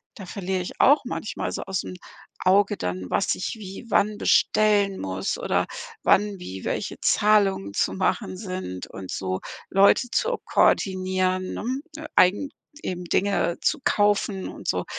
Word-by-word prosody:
da 195 - -9
verliere 190 -1 -2
ich 180 - -8
auch 285 +1 +6
manchmal 215 - -4
so - - -4
ausm 190 -1 -4 0.4
Auge 200 +2 +3
dann, 90 0 -4
was 195 - +1
ich 185 - -4
wie 195 +2 -9
wann 210 0 +2
bestellen 205 -2 +3
muss 95 0 -2
oder - - +1 0.4
wann 205 0 +3
wie 95 - -8
welche - - -3
Zahlungen 195 - +3
zu - - 0
machen 190 0 -1
sind 185 - -5
und 95 -1 -9
so 95 -1 -2 0.3
Leute 200 +6 +5
zu - - +1
koordinieren, 185 -1 +1
ne, 295 +6 -5
eigen 205 +10 +4 0.3
eben 180 -1 -4
Dinge 195 -1 +1
zu 305 - +1
kaufen 205 -2 +1
und - - -10
so, - - 0
195 Hz, 145 wpm, -24 LUFS, 185-210 Hz, 0.4 s, auch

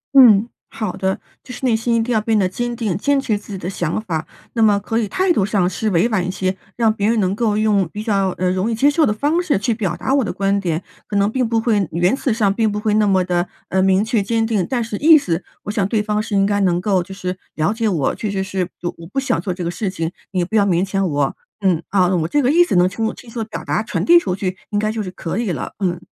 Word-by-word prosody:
嗯， 235 -4 +7 0.2
好 215 -4 -3
的， 190 +1 -2 0.2
就 250 - -10
是 265 - -5
内 245 - +3
心 230 +1 +1
一 230 - +2
定 245 - -3
要 220 - +3
变 220 0 +1
得 185 -2 +2
坚 240 +4 -3
定， 215 -7 -2
坚 285 +7 +2
持 220 -6 0
自 205 0 -10
己 - - -4
的 180 -1 -5
想 175 +1 -2
法， 165 -7 -3 0.3
那 230 - 0
么 210 -2 +5
可 210 +3 -2
以 220 - -1
态 370 - +1
度 205 - +2
上 195 -3 +1
是 215 +3 -2
委 185 +6 +2
婉 190 -6 0
一 - - -2
些， 185 0 -2 0.2
让 230 -2 +3
别 205 -1 -1
人 230 +1 +2
能 185 -1 +1
够 215 0 0
用 210 -4 +2
比 210 - -5
较， 200 -4 +1
呃， 180 0 +1
容 185 +4 0
易 230 - -1
接 275 +6 +4
受 310 +1 +3
的 210 - +1
方 295 +10 +1
式 320 - +1
去 220 +4 0
表 195 -6 -2
达 260 +10 -2
我 280 - +4
的 210 - -3
观 200 0 +1
点。 170 -3 -2 0.2
可 210 - -5
能 200 +1 +2
并 255 0 0
不 225 0 +1
会 210 -6 +1
言辞 185 - +1
上 210 -3 +2
并 220 +1 +1
不 210 - -3
会 210 0 0
那 215 -1 +3
么 190 -2 +3
地， 175 0 0 0.2
呃， 190 - +1
明 190 +1 +3
确 220 -1 +1
坚 225 +3 0
定。 215 -5 0
但 250 -3 0
是 220 -2 -4
意 315 +5 +7
思 175 - -2 0.2
我 205 - -4
想 200 -2 0
对 210 0 0
方 210 0 0
是 215 - -3
应 195 0 +4
该 205 0 +1
能 180 -3 +2
够 190 -1 +2
就 195 +2 -8
是 185 -1 -4 0.2
了 155 +5 +1
解 225 0 -1
我， 165 -9 +1
确 215 - -4
实 195 -1 -1
是 190 -2 -2 0.3
我 165 - -10
不 235 - -10
想 270 -11 +1
做 185 +1 -3
这 180 0 -5
个 170 - -2
事 195 +3 -3
情， 165 -3 -3 0.2
你 185 -2 0
不 220 +6 -1
要 200 - +4
勉 180 -2 +2
强 195 0 0
我， 145 -2 -1 0.2
嗯， 180 -5 +2
啊， 185 -1 +2
我 165 -3 +1
这 290 - +1
个 260 0 +2
意 350 +3 +5
思 - - -1
能 180 0 +4
清 220 +4 -3
楚 - - -3
清 240 - -14
楚 230 0 -5
表 215 - -7
达、 - - 0
传 220 - -3
递 345 +1 +7
出 185 - -2
去， 185 -1 -3
应 205 - 0
该 215 +1 0
就 220 0 -3
是 195 - -5
可 180 +1 -5
以 230 -5 -1
了， 145 - -4
嗯。 175 -3 -1
205 Hz, 310 characters per minute, -19 LUFS, 185-225 Hz, 0.3 s, 嗯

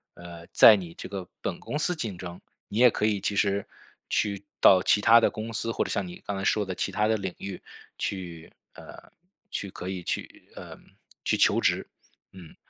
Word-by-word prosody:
呃， 85 -1 -11
在 110 - +8
你 90 -4 -7
这 - - -8
个 95 -3 -6
本 - - -4
公 150 - -4
司 180 +4 +1
竞 110 - -4
争， 90 0 -8 0.3
你 105 - -3
也 125 0 +8
可 105 - -1
以 105 -2 0
其 100 - -1
实 100 -1 +1 0.4
去 100 -2 -1 0.2
到 95 -1 +7
其 105 - +4
它 115 +3 +7
的 115 - +3
公 110 +1 -6
司 115 +1 -2
或 - - 0
者 - - -5
像 100 -2 -1
你 90 - -11
刚 100 - -3
才 95 - -4
说 105 +1 +1
的 95 - -4
其 100 - -3
它 105 +3 +1
的 110 0 +2
领 95 -3 -5
域 100 -2 -7 0.4
去， 85 -4 -5 0.2
呃， - - -13 0.4
去 100 - -4
可 90 0 -7
以 95 -1 -4
去， - - -5
呃， - - -10 0.4
去 - - +1
求 - - +3
职。 - - +1 0.4
嗯。 90 -4 -13
100 Hz, 220 characters per minute, -27 LUFS, 90-105 Hz, 0.4 s, 在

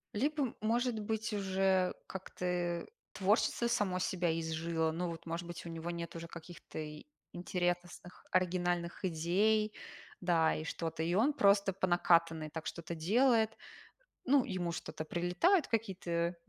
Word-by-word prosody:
Либо, 280 +2 0
может 235 +2 +1
быть, 220 +1 -2
уже 190 -2 +2
как-то, 190 -1 -6
э, 175 -1 -1 0.2
творчество 210 +4 +2
само 205 -6 +1
себя 180 -1 0
изжило. 160 0 -1
Ну 175 +2 -2
вот, 165 -1 -7
может 165 +1 -3
быть, 175 0 -7
у - - -5
него 165 +1 -4
нет 170 0 -5
уже 165 0 -6
каких-то 165 -1 -9
и 150 -1 -7 0.3
интересных, 175 0 -3
оригинальных 175 -1 0
идей, 195 +6 +2 0.5
да, 170 -3 +3
и 155 - -4
что-то, 160 0 -3
и 170 +2 0
он 250 +9 +4
просто 200 -4 +4
по 190 - 0
накатанной 165 -3 +3
так 160 +1 -6
что-то 170 0 -5
делает. 220 +6 +3 0.7
Ну, 275 0 +5
ему 185 -7 -2
что-то 155 - -5
прилетает, 180 - +2
какие-то 180 -6 -1
180 Hz, 140 wpm, -34 LUFS, 170-210 Hz, 0.7 s, Ну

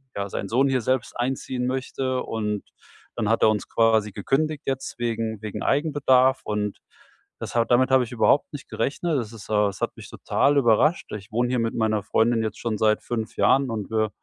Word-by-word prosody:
ja, 100 0 -2
sein 100 - -4
Sohn 130 +4 +3
hier 130 -2 +1
selbst 130 +1 -1
einziehen 125 0 -2
möchte. 130 0 -2
Und 105 -2 -3 0.5
dann 110 -3 -1
hat 115 - +2
er - - +7
uns 105 - -3
quasi 110 -2 +2
gekündigt 150 +9 -1
jetzt 135 -1 -3
wegen 115 -2 -2
wegen 105 -1 -5
Eigenbedarf 135 -3 +3
und 105 -1 -3 0.6
das - - -6
ha 115 -1 +3
damit 130 +3 +3
habe 130 -1 +5
ich 120 - -8
überhaupt 125 +4 +2
nicht 145 -3 -9
gerechnet. 150 +1 -1
Es 115 -3 -5
ist, 110 -3 -12
äh 105 -1 +3
es 95 - -9
hat - - -2
mich - - -11
total 145 +1 +1
überrascht. 140 +6 +3
Ich 105 +1 -8
wohne 120 +2 0
hier 125 -1 0
mit 115 0 -1
meiner 110 -2 +1
Freundin 115 +2 +2
jetzt 110 - -4
schon 115 -2 -2
seit 110 -1 +2
5 110 -3 -4
Jahren 135 -1 +3
und 110 -2 -4
wir 110 -1 +1
115 Hz, 200 wpm, -24 LUFS, 110-130 Hz, 0.6 s, er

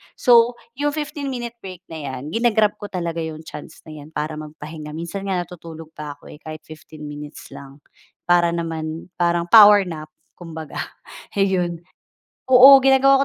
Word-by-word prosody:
So 240 -1 +4 0.2
'yong 290 +1 0
fifteen-minute 265 -6 -5
break 185 -1 -10
na 160 - -6
'yan, 140 +1 -6
ginag-grab 220 -2 +2
ko 205 - -6
talaga 170 -3 -4
'yong 160 -1 -6
chance 155 0 -11
na 160 - -12
'yan 150 -1 -10
para 155 +1 -3
magpahinga. 155 0 -9
Minsan 180 +4 -6
nga 190 - 0
natutulog 165 -2 -11
pa 150 -2 -8
ako, - - -15
eh, 150 - -13
kahit 155 -1 -9
15 155 -1 -13
minutes 145 +1 -10
lang, 140 +1 -12 0.4
para 175 -1 +3
naman, 165 0 -5
parang 170 0 +1
power 210 -2 +9
nap 160 -4 -7 0.3
kumbaga, 160 -3 -9 0.6
ayon. 180 -3 +1 0.7
Oo, 260 +2 +9
ginagawa 270 +1 +5
170 Hz, 155 wpm, -21 LUFS, 155-210 Hz, 0.7 s, power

